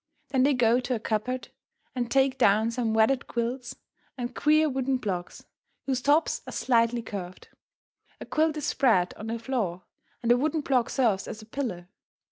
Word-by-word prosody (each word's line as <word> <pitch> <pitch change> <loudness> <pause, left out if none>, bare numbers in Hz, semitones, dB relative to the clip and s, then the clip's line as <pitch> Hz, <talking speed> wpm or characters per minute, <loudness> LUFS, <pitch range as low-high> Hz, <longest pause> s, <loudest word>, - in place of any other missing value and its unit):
Then 265 - +1
they 280 +1 +4
go 240 0 +3
to 250 0 -2
a - - -3
cupboard 225 +4 -2 0.4
and 245 -2 -2
take 270 0 +2
down 220 0 +4
some 230 -2 -1
wadded 230 +4 +2
quilts 245 +2 -3 0.4
and 245 0 -4
queer 310 +3 +3
wooden 265 -1 0
blocks, 185 -7 -5 0.4
whose 260 -2 -1
tops 295 +5 +2
are - - -6
slightly 235 -1 +2
curved. 185 -4 -7 0.7
A - - -7
quilt 310 0 +1
is 295 - -3
spread 195 -13 +2
on 215 - -9
the 230 +1 -2
floor, 225 -7 -3 0.4
and 235 - +2
a 240 - +6
wooden 305 +4 0
block 260 -4 +1
serves 225 -8 +1
as 215 - -7
a - - -13
pillow. 220 -8 -4
245 Hz, 175 wpm, -27 LUFS, 220-265 Hz, 0.7 s, a